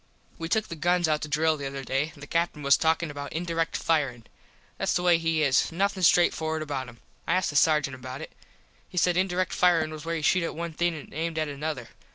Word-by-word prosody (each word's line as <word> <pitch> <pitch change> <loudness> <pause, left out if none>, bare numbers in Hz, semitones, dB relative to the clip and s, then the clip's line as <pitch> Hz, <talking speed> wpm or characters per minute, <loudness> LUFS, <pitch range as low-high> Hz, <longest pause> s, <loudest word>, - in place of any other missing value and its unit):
We 165 0 -4
took 215 +3 +1
the 165 - -6
guns 175 +2 +2
out 155 -1 +1
to 155 - -4
drill 155 +2 +2
the 140 -1 -4
other 135 0 -6
day. 135 +4 -1
The 140 - -9
Captin 165 -1 -1
was 140 -1 +6
talkin 160 0 +1
about 145 0 -7
indirect 165 -1 -1
firin. 140 -8 0 0.6
Thats - - 0
the 175 - 0
way 175 -2 +4
he 165 -1 +1
is. 135 +2 +3
Nothin 195 +3 0
straight 175 0 +5
forward 160 0 -2
about 135 -4 -4
him. 120 -1 -16 0.3
I - - +2
asked 185 -3 +1
the - - -10
sargent 150 -2 +3
about 130 +2 -7
it. - - -8 0.6
He 180 - -11
said 175 0 +3
indirect 185 -1 0
firin 165 -3 +3
was 155 -1 -8
where 165 0 -2
you 160 - -4
shot 185 +4 +3
at 165 - -3
one 170 0 -4
thing 175 +1 0
an 150 - -9
aimed 165 +1 -3
at 155 0 0
another. 145 -4 -4
160 Hz, 235 wpm, -27 LUFS, 145-170 Hz, 0.6 s, was